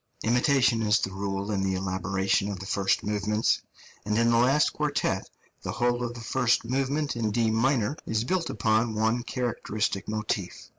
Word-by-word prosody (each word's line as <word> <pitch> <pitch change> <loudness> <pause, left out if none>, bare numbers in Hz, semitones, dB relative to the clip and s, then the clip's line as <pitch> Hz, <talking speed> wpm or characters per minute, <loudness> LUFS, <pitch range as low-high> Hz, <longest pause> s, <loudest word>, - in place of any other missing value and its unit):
Imitation 125 0 +3
is 105 -1 +3
the 95 - -2
rule 100 +1 -3
in 100 -2 0
the 95 -1 0
elaboration 95 +1 0
of 100 - -4
the 95 - -7
first 100 0 +1
movements; 105 +1 0 0.4
and 105 +1 -1
in 115 0 +3
the 115 - +4
last 135 +5 +3
quartet 145 -10 -1 0.3
the - - -4
whole 120 0 0
of 120 0 -4
the 120 - -8
first 115 +2 +1
movement 135 +3 -1
in 115 -2 -1
D 115 +1 +1
minor 120 +2 +1
is 110 0 0
built 175 +5 -1
upon 110 +1 +1
one 110 +3 +1
characteristic 110 -5 -2
motif. 105 -3 -3
110 Hz, 170 wpm, -27 LUFS, 100-120 Hz, 0.4 s, the